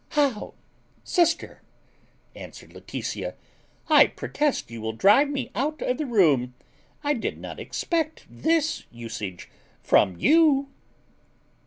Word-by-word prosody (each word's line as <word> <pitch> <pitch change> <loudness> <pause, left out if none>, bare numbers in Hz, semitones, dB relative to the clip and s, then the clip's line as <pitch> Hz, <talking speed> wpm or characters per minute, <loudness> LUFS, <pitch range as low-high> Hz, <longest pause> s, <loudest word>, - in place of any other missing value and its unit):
"How, 275 -8 0 0.5
sister!" 340 -2 0 0.7
answered - - -11
Laetitia; - - -5 0.5
"I - - +7
protest 295 - -2
you 115 -1 -7
will 110 0 -3
drive 210 - +5
me 265 -4 -4
out 305 +4 -2
of 250 - -1
the 305 - -2
room: 145 - +3 0.5
I 290 0 +2
did 240 - -3
not - - -8
expect 320 -2 -2
this 320 -1 0
usage 110 -6 -7 0.4
from 95 -4 +3
you." 295 - +4
270 Hz, 115 wpm, -25 LUFS, -, 0.7 s, I